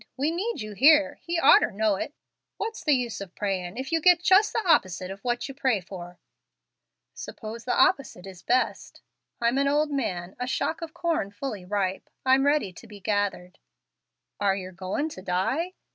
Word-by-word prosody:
We 285 Hz, +4 st, +1 dB
need 400 Hz, -, -3 dB
you 215 Hz, 0 st, -6 dB
here, 295 Hz, +6 st, +6 dB
and -, -, -20 dB
He 340 Hz, 0 st, -2 dB
orter 285 Hz, -, +6 dB
know 210 Hz, 0 st, +1 dB
it. 285 Hz, +9 st, -5 dB, 0.4 s
What's 450 Hz, +1 st, -4 dB
the 300 Hz, -3 st, +4 dB
use 240 Hz, -5 st, -3 dB
of 190 Hz, -2 st, -9 dB
prayin' 190 Hz, -1 st, -3 dB
if 265 Hz, +3 st, -5 dB
you 325 Hz, 0 st, +1 dB
get 360 Hz, +1 st, +6 dB
just 380 Hz, +4 st, +5 dB
the 445 Hz, -4 st, -2 dB
opposite 185 Hz, -, +2 dB
of 195 Hz, -, -8 dB
what 240 Hz, +4 st, -2 dB
you 275 Hz, -, -7 dB
pray 260 Hz, -5 st, +1 dB
for?" 180 Hz, -1 st, -10 dB, 1.0 s
"Suppose 225 Hz, +1 st, -8 dB
the 250 Hz, -, 0 dB
opposite 270 Hz, -, +2 dB
is 185 Hz, -3 st, -11 dB
best? 250 Hz, +7 st, -1 dB, 0.4 s
I'm 240 Hz, +3 st, +2 dB
an 280 Hz, -, +2 dB
old 295 Hz, +1 st, +2 dB
man 190 Hz, -10 st, -3 dB
a 250 Hz, -, -2 dB
shock 320 Hz, +5 st, -1 dB
of 330 Hz, 0 st, -7 dB
corn 335 Hz, -, -1 dB
fully 205 Hz, -2 st, -6 dB
ripe. 195 Hz, -1 st, -2 dB, 0.2 s
I'm 265 Hz, +1 st, +4 dB
ready 285 Hz, -10 st, +1 dB
to 230 Hz, -, -13 dB
be 210 Hz, -1 st, -12 dB
gathered." 200 Hz, -2 st, -2 dB, 0.8 s
"Are 200 Hz, -1 st, +2 dB
yer 185 Hz, -1 st, -6 dB
goin' 190 Hz, -, -3 dB
to 185 Hz, -, -10 dB
die?" 230 Hz, -, -1 dB
235 Hz, 190 wpm, -26 LUFS, 195-295 Hz, 1.0 s, here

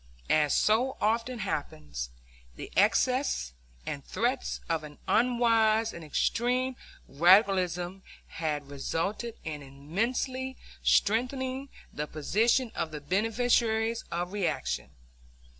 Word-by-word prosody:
As 150 Hz, -2 st, +4 dB
so 240 Hz, +5 st, +2 dB
often 230 Hz, +3 st, 0 dB
happens, 75 Hz, -, -4 dB, 0.5 s
the -, -, -8 dB
excesses 250 Hz, -, +2 dB, 0.3 s
and 140 Hz, -, -4 dB
threats 240 Hz, -, -1 dB
of 165 Hz, -2 st, -1 dB
an 150 Hz, -1 st, -10 dB
unwise 230 Hz, -2 st, +3 dB
and 170 Hz, -, -8 dB
extreme 250 Hz, -, 0 dB, 0.3 s
radicalism 180 Hz, +2 st, +3 dB, 0.2 s
had 150 Hz, -3 st, -3 dB
resulted 195 Hz, -, -2 dB
in 155 Hz, -3 st, -5 dB
immensely 230 Hz, -, -2 dB, 0.2 s
strengthening 260 Hz, +5 st, +1 dB, 0.2 s
the 150 Hz, +1 st, -3 dB
position 225 Hz, -, +1 dB
of 165 Hz, -, -2 dB
the 155 Hz, -1 st, -6 dB
beneficiaries 225 Hz, +5 st, +1 dB
of 175 Hz, +2 st, -3 dB
reaction. 70 Hz, -, -1 dB
210 Hz, 100 wpm, -29 LUFS, 155-240 Hz, 0.5 s, As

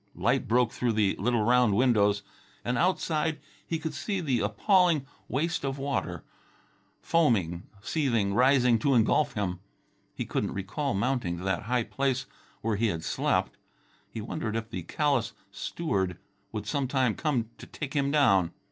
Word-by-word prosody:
Light 125 Hz, +1 st, +1 dB
broke 120 Hz, +1 st, +3 dB
through 120 Hz, -2 st, 0 dB
the 105 Hz, -3 st, +2 dB
little 115 Hz, +2 st, +1 dB
round 120 Hz, -2 st, +4 dB
windows, 105 Hz, -4 st, +3 dB, 0.4 s
and 125 Hz, -, 0 dB
outside 160 Hz, -1 st, +1 dB, 0.3 s
he 165 Hz, -, -2 dB
could 160 Hz, 0 st, -4 dB
see 195 Hz, +7 st, -2 dB
the 135 Hz, -8 st, 0 dB
appalling 160 Hz, -, +3 dB, 0.2 s
waste 160 Hz, +6 st, -1 dB
of 135 Hz, 0 st, -2 dB
water, 140 Hz, 0 st, -2 dB, 0.8 s
foaming, 100 Hz, -, +1 dB, 0.2 s
seething, 115 Hz, -11 st, +1 dB
rising 125 Hz, -1 st, +4 dB
to 135 Hz, +3 st, +2 dB
engulf 125 Hz, +4 st, +3 dB
him. 95 Hz, -4 st, -2 dB, 0.6 s
He -, -, -3 dB
couldn't -, -, -2 dB
recall 100 Hz, +7 st, -2 dB
mounting 105 Hz, -5 st, 0 dB
to 90 Hz, -, -7 dB
that 95 Hz, 0 st, 0 dB
high 125 Hz, -1 st, +2 dB
place 135 Hz, +1 st, -1 dB, 0.4 s
where 110 Hz, -2 st, 0 dB
he 115 Hz, +2 st, +2 dB
had 85 Hz, -6 st, -2 dB
slept. -, -, 0 dB, 0.5 s
He 110 Hz, -, -6 dB
wondered 110 Hz, -1 st, -3 dB
if 115 Hz, 0 st, -4 dB
the 90 Hz, -, -4 dB
callous 135 Hz, -, 0 dB, 0.2 s
steward 95 Hz, -, -2 dB, 0.3 s
would 105 Hz, -2 st, -4 dB
sometime 130 Hz, -1 st, +1 dB
come 125 Hz, -7 st, -1 dB
to -, -, -10 dB
take 145 Hz, -3 st, -6 dB
him 140 Hz, -2 st, +1 dB
down. 100 Hz, -, +3 dB
125 Hz, 155 wpm, -28 LUFS, 105-140 Hz, 0.8 s, round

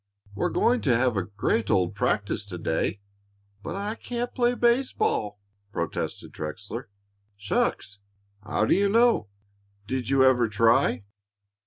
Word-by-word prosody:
We're 100 Hz, -, -1 dB
going 245 Hz, +1 st, +2 dB
to 125 Hz, -5 st, +3 dB
have 125 Hz, -1 st, +1 dB
a 95 Hz, -, +1 dB
great 105 Hz, +3 st, -1 dB
old 90 Hz, 0 st, +2 dB
practice 105 Hz, +1 st, -1 dB
to 95 Hz, -3 st, -7 dB
day." 80 Hz, +4 st, -1 dB, 0.6 s
"But 165 Hz, -, -5 dB
I 205 Hz, +2 st, -3 dB
can't 240 Hz, +1 st, -4 dB
play 245 Hz, 0 st, +2 dB
baseball," 235 Hz, -, +1 dB, 0.3 s
protested 85 Hz, -4 st, -4 dB
Trexler. 105 Hz, +10 st, -6 dB, 0.5 s
"Shucks! 100 Hz, 0 st, -1 dB, 0.4 s
How 110 Hz, -, 0 dB
do -, -, +3 dB
you 200 Hz, +1 st, +3 dB
know? 230 Hz, -, +3 dB, 0.6 s
Did 125 Hz, +1 st, -3 dB
you 135 Hz, -1 st, +4 dB
ever 120 Hz, -3 st, +4 dB
try?" 115 Hz, +2 st, +3 dB
115 Hz, 135 wpm, -26 LUFS, -, 0.6 s, you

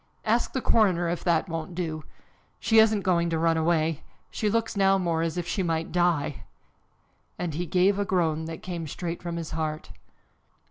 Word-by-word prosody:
Ask 230 Hz, +2 st, +1 dB
the 260 Hz, -, -1 dB
coroner 185 Hz, -6 st, +3 dB
if 175 Hz, -, -3 dB
that 170 Hz, 0 st, +2 dB
won't 165 Hz, 0 st, -5 dB
do. 160 Hz, -3 st, -3 dB, 0.6 s
She 225 Hz, -1 st, +4 dB
isn't 220 Hz, -2 st, +4 dB
going 170 Hz, -3 st, +1 dB
to 165 Hz, -, 0 dB
run 165 Hz, 0 st, +2 dB
away. 160 Hz, -1 st, +1 dB, 0.3 s
She 215 Hz, -, -1 dB
looks 225 Hz, +1 st, 0 dB
now 195 Hz, -1 st, +4 dB
more 170 Hz, -3 st, 0 dB
as 165 Hz, +1 st, -2 dB
if 175 Hz, -1 st, -3 dB
she 195 Hz, -, -1 dB
might 165 Hz, -2 st, -1 dB
die!" 165 Hz, -5 st, +1 dB, 1.0 s
and 175 Hz, -3 st, -3 dB
he 175 Hz, +4 st, -3 dB
gave 190 Hz, +4 st, +3 dB
a -, -, +2 dB
groan 165 Hz, -5 st, 0 dB
that 160 Hz, 0 st, -7 dB
came 170 Hz, -3 st, -5 dB
straight 170 Hz, +3 st, -5 dB
from 170 Hz, -1 st, -4 dB
his 165 Hz, -2 st, -5 dB
heart. 155 Hz, -7 st, -3 dB
170 Hz, 185 wpm, -26 LUFS, 160-190 Hz, 1.0 s, She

